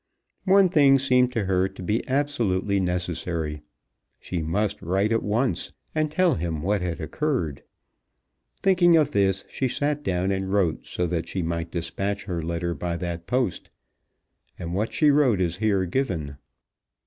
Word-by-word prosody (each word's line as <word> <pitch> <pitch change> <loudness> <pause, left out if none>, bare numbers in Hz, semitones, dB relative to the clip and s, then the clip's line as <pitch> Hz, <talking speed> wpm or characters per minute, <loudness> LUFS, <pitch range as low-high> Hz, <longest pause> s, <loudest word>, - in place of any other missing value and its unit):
One 195 0 +6
thing 145 -6 +5
seemed 125 -2 +3
to 115 -5 -1
her 95 0 +1
to 95 -1 -10
be 105 +5 0
absolutely 115 -9 0
necessary. 85 -4 -2 0.6
She 90 -2 -4
must 100 +6 -1
write 95 +5 0
at 115 - +2
once 115 +5 -1 0.2
and 155 -1 0
tell 175 +1 +2
him 80 - -3
what 100 +1 +1
had 90 -1 -3
occurred. 85 - -2 1.0
Thinking 180 -3 +5
of 150 -2 +2
this 95 -4 +1
she 130 - -2
sat 145 +4 -1
down 95 -7 0
and 95 0 -2
wrote 95 -5 0
so 90 - -2
that 85 -1 -2
she 95 - -2
might 85 0 -3
despatch 95 +4 -3
her 90 -4 -3
letter 85 +1 -2
by 85 0 -3
that 85 -1 -5
post; 125 -7 -1 0.9
and 85 0 -5
what 105 +4 -1
she 150 -2 +4
wrote 135 -8 +3
is 85 -2 0
here 100 -3 +1
given. 85 - -2
95 Hz, 160 wpm, -25 LUFS, 85-130 Hz, 1.0 s, One